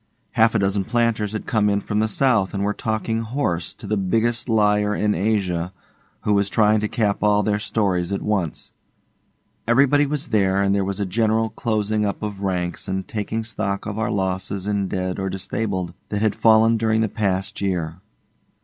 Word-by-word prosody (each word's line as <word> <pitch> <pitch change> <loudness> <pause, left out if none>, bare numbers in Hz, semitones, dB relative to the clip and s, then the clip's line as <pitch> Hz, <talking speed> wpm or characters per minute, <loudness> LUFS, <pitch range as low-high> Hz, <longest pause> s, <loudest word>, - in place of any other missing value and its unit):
Half 115 +1 +3
a - - +5
dozen 100 -1 +1
planters 115 -3 0
had 110 - -4
come 110 -4 +2
in 100 0 +2
from 105 +1 -2
the 110 - +2
south 110 -4 +1
and 100 - -1
were 105 +1 0
talking 110 +1 -2
'horse' 110 - -2
to - - -10
the 105 +1 0
Biggest 115 +6 0
Liar 105 -1 +2
in 105 0 +1
Asia, 90 -3 0 0.5
who 105 - +1
was 100 0 +2
trying 110 0 +3
to 105 - -1
cap 105 -3 0
all 105 0 +3
their 105 +1 0
stories 100 -4 0
at 100 - -2
once. 95 -7 -2 1.0
Everybody 140 +4 +4
was 150 +1 -2
there, 100 -3 +2
and 100 0 +2
there 100 -1 +1
was 100 +1 -3
a 100 - 0
general 110 +3 +1
closing 110 -2 -1
up 100 +1 -2
of 105 -2 -4
ranks 90 -3 -2
and 95 0 -3
taking 110 +1 -3
stock 105 -3 -3
of 105 +1 -4
our 110 - 0
losses 95 0 -2
in 100 -2 0
dead 95 0 -3
or 95 0 -2
disabled 95 -2 -3 0.2
that 105 +1 -1
had 110 -2 +2
fallen 115 0 +4
during 110 0 +1
the 110 - +2
past 100 -3 -2
year. 85 -4 -2
105 Hz, 190 wpm, -22 LUFS, 95-110 Hz, 1.0 s, a